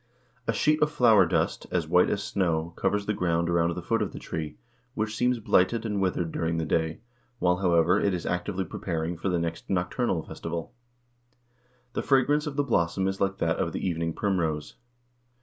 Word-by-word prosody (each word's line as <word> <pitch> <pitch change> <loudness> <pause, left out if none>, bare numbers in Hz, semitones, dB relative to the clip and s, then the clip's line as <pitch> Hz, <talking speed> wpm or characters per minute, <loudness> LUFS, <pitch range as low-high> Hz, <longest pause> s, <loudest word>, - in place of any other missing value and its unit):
A 115 - +2
sheet 155 +7 +2
of 150 - +4
flower 120 -8 +5
dust, - - 0
as 85 -4 -1
white 90 +2 +4
as 100 - -1
snow, 85 -3 -1
covers 100 +1 0
the 105 - 0
ground 85 -2 0
around 85 0 +2
the - - -5
foot - - 0
of - - -2
the - - -7
tree, 75 -2 -5 0.4
which 110 -2 -2
seems 125 +2 +2
blighted 115 +1 +2
and 105 -3 -1
withered 90 -3 0
during 80 0 -1
the 80 - -1
day, 80 +2 -1 0.4
while, 90 -4 +2
however, 90 0 +3
it 100 - +2
is 90 -2 -3
actively 95 +2 -2
preparing 80 +1 -3
for 90 +4 -2
the 90 - +1
next 85 -1 -4
nocturnal 90 0 0
festival. 85 +6 -6 1.2
The - - -1
fragrance 145 +3 +2
of 145 - -4
the 145 - +2
blossom 95 -6 +1
is 95 0 -3
like 100 0 +1
that 80 -1 0
of - - -1
the - - -2
evening 85 -2 -1
primrose. 80 -7 -1
90 Hz, 190 wpm, -27 LUFS, 85-105 Hz, 1.2 s, flower